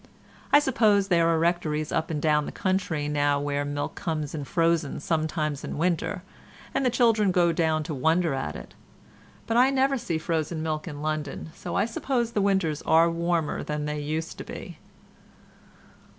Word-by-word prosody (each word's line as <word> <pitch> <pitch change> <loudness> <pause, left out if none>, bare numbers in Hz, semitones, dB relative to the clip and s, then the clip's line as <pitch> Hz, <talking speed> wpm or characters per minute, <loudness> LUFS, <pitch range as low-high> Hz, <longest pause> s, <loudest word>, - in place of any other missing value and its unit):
I - - +8
suppose 220 -8 +3
there 170 -2 +4
are 165 - +3
rectories 160 -2 0
up 160 -1 -1
and 155 -2 -2
down 150 -1 +2
the - - -5
country 185 -6 -1
now 145 -1 +1
where 145 0 -1
the 145 - -4
milk 145 0 -3
comes 155 -4 -3
in 145 -3 -4
frozen 165 -1 +1
sometimes 155 -2 -1
in - - -5
winter, 170 +1 -1 0.5
and - - 0
the 255 - +3
children 225 -5 +3
go 175 -1 +3
down 160 -2 +1
to 155 - -5
wonder 160 +4 +2
at 135 0 -3
it, - - -10 0.7
but 230 - 0
I 255 +2 +6
never 270 0 +2
see 170 -6 -3
any - - -1
frozen 160 0 -2
milk 155 +1 -3
in 145 -2 -6
London, 155 0 -3
so 175 - -6
I 200 - +3
suppose 235 +1 -1
the 210 - 0
winters 190 -6 +1
are 165 +1 +4
warmer 170 -2 -1
than 150 0 -3
they 150 0 -3
used 155 +3 -4
to - - -5
be. - - -9
160 Hz, 185 wpm, -26 LUFS, 150-185 Hz, 0.7 s, I